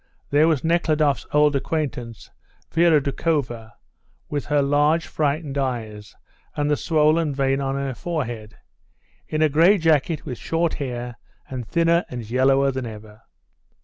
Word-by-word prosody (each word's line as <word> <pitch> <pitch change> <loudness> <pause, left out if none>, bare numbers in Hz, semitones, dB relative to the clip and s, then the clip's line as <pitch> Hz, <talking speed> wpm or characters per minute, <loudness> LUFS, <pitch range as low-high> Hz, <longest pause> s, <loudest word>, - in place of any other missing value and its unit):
There 150 +3 +4
was 155 -6 +1
Nekhludoff's 155 -5 +1
old 150 -1 +3
acquaintance, 130 -6 -4 0.4
Vera 165 -2 +4
Doukhova, 135 -6 -2 0.6
with 145 -1 -3
her 145 -2 +2
large, 145 +4 +2
frightened 145 -1 -2
eyes, 110 -6 -4 0.4
and 145 0 0
the - - +4
swollen 155 -1 +2
vein 135 0 +1
on 135 0 -2
her 140 -1 -2
forehead, 120 -9 -5 0.7
in 155 0 0
a - - +5
grey 165 +8 +4
jacket 160 -2 +1
with 125 -4 -6
short 165 +6 -1
hair, 120 -3 -5 0.3
and 125 -4 -5
thinner 170 +1 +2
and 120 -3 -6
yellower 135 +3 +3
than 130 -2 -4
ever.. 110 0 -11
140 Hz, 140 wpm, -22 LUFS, 125-155 Hz, 0.7 s, a